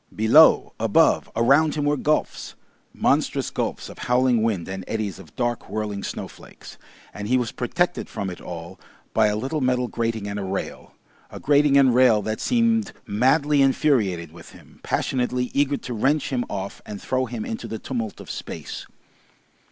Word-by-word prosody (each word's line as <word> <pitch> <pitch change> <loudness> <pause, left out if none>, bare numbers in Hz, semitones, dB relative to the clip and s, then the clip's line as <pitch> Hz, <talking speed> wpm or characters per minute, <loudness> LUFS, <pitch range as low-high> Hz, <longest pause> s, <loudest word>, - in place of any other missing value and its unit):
Below, 110 +1 +5
above, - - +3
around 140 +7 +3
him 145 -1 -1
were 145 0 +2
gulfs, 150 +2 -1 0.4
monstrous - - 0
gulfs - - -3
of - - -12
howling 125 -1 +2
wind 105 -7 -1
and 95 0 -5
eddies 105 -4 -3
of 85 -5 -15
dark, 120 -1 -2
whirling 105 -2 -3
snowflakes, - - -9 0.3
and 105 0 -6
he 130 +3 +3
was 120 -3 -1
protected - - -1
from 95 -2 -4
it 90 - -10
all 85 +1 -8 0.3
by 110 -1 +4
a 105 - 0
little 135 +8 -2
metal 125 -1 +1
grating 115 -3 -2
and 100 0 -4
a - - -3
rail, 95 +1 -5 0.3
a - - -9
grating 145 -1 +4
and 135 -3 +5
rail 120 -4 +4
that 110 +1 -3
seemed 230 -3 +1
madly 140 +7 +2
infuriated 115 - +1
with 85 0 -14
him, - - -18
passionately 125 -1 -1
eager 140 0 +1
to 125 - -7
wrench 135 +7 +1
him 120 -1 0
off 100 -1 -5
and 105 -1 -8
throw 130 +3 -1
him 225 - -5
into 235 -1 -5
the 110 - -5
tumult 115 -3 -5
of - - -11
space. - - -7
120 Hz, 170 wpm, -23 LUFS, 105-140 Hz, 0.4 s, Below